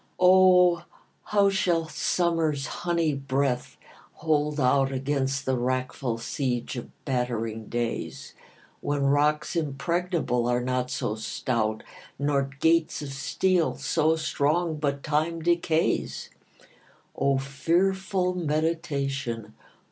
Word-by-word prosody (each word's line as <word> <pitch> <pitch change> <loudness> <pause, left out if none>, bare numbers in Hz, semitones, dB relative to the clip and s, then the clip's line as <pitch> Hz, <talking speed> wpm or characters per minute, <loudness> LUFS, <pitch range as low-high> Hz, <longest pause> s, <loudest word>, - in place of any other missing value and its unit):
O, 180 -1 +6 0.4
how 200 -1 +3
shall 170 -4 +1
summer's 160 -4 0
honey 170 -3 -1
breath 135 -2 -1 0.4
hold 150 -1 0
out 135 +1 +3
Against 135 0 -1
the 130 - +1
wreckful 130 -1 -2
siege 125 +1 -2
of 120 - -6 0.2
battering 115 -4 -2
days, 120 -1 -4 0.5
When 145 -1 -1
rocks 150 +3 +2
impregnable 160 -4 -1
are 120 0 +2
not 125 0 -1
so 125 -4 -2
stout, 110 0 -2 0.3
Nor 140 -1 0
gates 165 -2 +2
of 140 -2 -6
steel 170 +5 +1
so 160 0 +1
strong, 155 +1 0
but 140 -2 -2
Time 155 +3 0
decays? 170 -1 0 0.8
O 140 -1 +2
fearful 180 +7 0
meditation! 140 -7 -2
145 Hz, 100 wpm, -26 LUFS, 130-165 Hz, 0.8 s, O